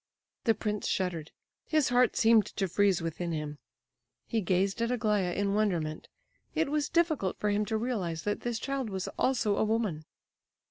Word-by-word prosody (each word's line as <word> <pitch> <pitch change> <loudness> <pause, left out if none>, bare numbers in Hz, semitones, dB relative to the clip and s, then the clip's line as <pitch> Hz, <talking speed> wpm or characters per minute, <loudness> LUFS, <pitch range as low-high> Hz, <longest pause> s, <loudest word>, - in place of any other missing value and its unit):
The 225 -2 +4
prince 210 0 -2
shuddered; 170 -5 -1 0.4
his 310 -3 +2
heart 245 -1 +3
seemed 225 -2 +5
to 195 - -2
freeze 190 -1 +2
within 165 +1 -3
him. 150 -2 -4 0.7
He 225 -2 -1
gazed 190 +4 +1
at 230 - +1
Aglaya 210 -6 +1
in 200 +1 0
wonderment; 175 -8 0 0.5
it 315 -3 +1
was 300 -1 0
difficult 315 - +1
for 210 - +1
him 210 +1 +1
to 220 +1 -1
realize 195 -9 -2
that 205 - -1
this 240 -1 -2
child 270 -1 -3
was 190 -2 -3
also 235 -6 +1
a - - +3
woman. 215 -8 -1
210 Hz, 170 wpm, -30 LUFS, 180-235 Hz, 0.7 s, seemed